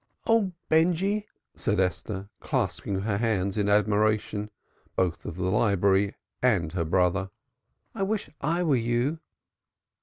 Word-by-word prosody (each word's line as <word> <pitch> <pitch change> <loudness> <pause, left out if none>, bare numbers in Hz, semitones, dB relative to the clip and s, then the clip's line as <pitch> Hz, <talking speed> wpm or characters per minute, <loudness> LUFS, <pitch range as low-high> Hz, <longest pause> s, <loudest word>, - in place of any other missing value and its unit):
"Oh, 225 -4 +3 0.2
Benjy!" 180 +6 +2 0.3
said 105 -3 0
Esther, 95 +2 -2
clasping 95 -1 -1
her 100 -1 0
hands 100 -4 0
in 105 -1 +1
admiration, 105 0 +2 0.5
both 85 -3 0
of - - -5
the 90 - -4
library 100 0 +2 0.3
and 100 -11 +2
her 85 -3 -1
brother. 90 +3 +1 0.6
"I - - -5
wish 205 +2 -1
I 170 +5 +1
were 155 -5 +3
you." 120 +7 0
105 Hz, 125 wpm, -27 LUFS, 95-140 Hz, 0.6 s, Oh